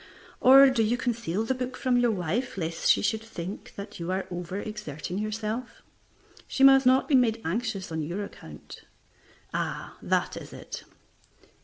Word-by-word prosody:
Or, 270 +1 +8
do 245 -3 +1
you 225 +3 +2
conceal 230 -6 -1
the 260 - 0
book 255 0 -4
from 255 -2 +1
your 245 -1 +3
wife 200 +5 -2
lest 165 -2 -1
she - - +5
should 220 +1 0
think 200 -4 -7
that 200 0 -8
you 170 +1 -4
are 190 +1 -1
over 175 +2 -5
exerting 195 -5 -5
yourself? 215 +3 -4 0.6
She 270 - 0
must 270 -1 +7
not 260 +1 +4
be 300 - -1
made 235 -4 +4
anxious 195 0 -2
on 160 0 -2
your 175 +7 -3
account. 75 - -12 0.7
Ah, - - -4
that - - 0
is - - -9
it. - - -8
215 Hz, 165 wpm, -27 LUFS, 185-245 Hz, 0.7 s, Or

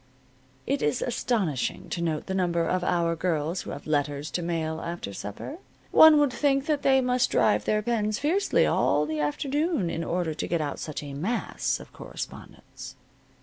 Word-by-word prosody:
It 275 +2 0
is 150 - +1
astonishing 195 - -1
to 170 - -3
note 160 -3 -1
the 190 - -3
number 175 -3 +1
of 180 +1 0
our 170 -2 +1
girls 165 0 -1
who - - -9
have 145 - -7
letters 145 0 -1
to 175 - -2
mail 160 -2 -2
after 170 -12 -5
supper. 105 - -7 0.3
One 315 -1 +8
would 290 -3 +3
think 275 +1 +1
that 300 -2 0
they 265 -1 +4
must 250 0 +2
drive 210 - +2
their 215 0 +1
pens 215 -3 0
fiercely 355 +8 +2
all 150 - +2
the 155 0 -3
afternoon 270 - 0
in 165 - -3
order 170 -1 -1
to 155 - -4
get 170 - 0
out 145 -2 -3
such 155 -1 -5
a 140 -1 -7
mass 190 +13 -2
of - - -13
correspondence. - - -9
175 Hz, 180 wpm, -27 LUFS, 155-250 Hz, 0.3 s, One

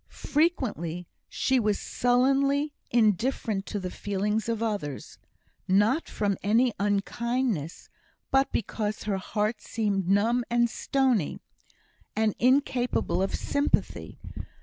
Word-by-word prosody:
Frequently 225 - 0 0.2
she 265 -1 +1
was 210 -3 +1
sullenly 275 +4 +1 0.2
indifferent 220 -2 +1
to 205 - -3
the 185 -1 -5
feelings 210 +2 -2
of 230 -1 -1
others 200 - -4 0.5
not 210 - +2
from 200 -3 -1
any 230 +4 +3
unkindness, 205 - -1 0.4
but 270 0 +3
because 215 -2 -2
her 205 -2 -1
heart 210 +3 -2
seemed 200 -5 -1
numb 225 +5 +3
and 235 0 +2
stony, 255 - 0 0.8
and 220 -1 +2
incapable 250 -4 +2
of 195 - 0
sympathy. 285 0 -1
220 Hz, 105 wpm, -27 LUFS, 200-250 Hz, 0.8 s, any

